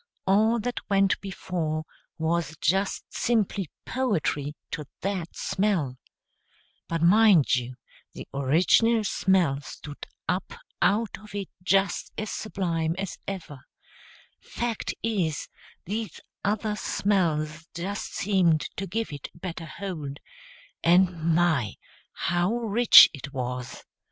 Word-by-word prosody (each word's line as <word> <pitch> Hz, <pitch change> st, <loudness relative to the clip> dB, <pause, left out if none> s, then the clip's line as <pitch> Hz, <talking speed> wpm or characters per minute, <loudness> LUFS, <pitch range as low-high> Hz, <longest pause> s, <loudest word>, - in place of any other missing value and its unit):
All 220 Hz, +4 st, +4 dB
that 245 Hz, +2 st, -2 dB
went 195 Hz, -1 st, +3 dB
before 170 Hz, -5 st, -3 dB, 0.3 s
was 160 Hz, -1 st, -1 dB
just 190 Hz, +5 st, 0 dB
simply 205 Hz, -7 st, 0 dB, 0.2 s
poetry 160 Hz, -, -1 dB, 0.2 s
to 150 Hz, -, -4 dB, 0.2 s
that 190 Hz, -3 st, -3 dB
smell, 170 Hz, -11 st, 0 dB, 0.9 s
but 165 Hz, -1 st, -1 dB
mind 195 Hz, -4 st, +6 dB
you, 125 Hz, 0 st, -3 dB, 0.4 s
the -, -, -9 dB
original 180 Hz, -, +3 dB
smell 180 Hz, -8 st, +2 dB
stood 145 Hz, 0 st, -9 dB, 0.2 s
up 185 Hz, -, -2 dB, 0.3 s
out 215 Hz, 0 st, +2 dB
of 210 Hz, -1 st, -12 dB
it 200 Hz, -2 st, -4 dB
just 195 Hz, 0 st, +1 dB
as 215 Hz, -1 st, -3 dB
sublime 170 Hz, -6 st, -2 dB
as 195 Hz, -2 st, -4 dB
ever, 170 Hz, -8 st, -6 dB, 0.8 s
fact 235 Hz, -2 st, -3 dB
is, 185 Hz, -10 st, -1 dB, 0.4 s
these 210 Hz, -1 st, -4 dB, 0.2 s
other 210 Hz, +1 st, 0 dB
smells 165 Hz, -7 st, 0 dB
just 195 Hz, +5 st, -4 dB
seemed 180 Hz, -6 st, +3 dB, 0.2 s
to 195 Hz, -, -3 dB
give 220 Hz, -2 st, -3 dB
it 145 Hz, -, -7 dB
a -, -, -15 dB
better 170 Hz, -1 st, -6 dB
hold; 155 Hz, -7 st, -6 dB, 0.6 s
and 170 Hz, -1 st, +3 dB
my, 160 Hz, -, +2 dB, 0.4 s
how 175 Hz, +5 st, 0 dB
rich 235 Hz, 0 st, +8 dB
it 140 Hz, 0 st, -8 dB
was! 125 Hz, -1 st, -4 dB
180 Hz, 115 wpm, -26 LUFS, 155-205 Hz, 0.9 s, rich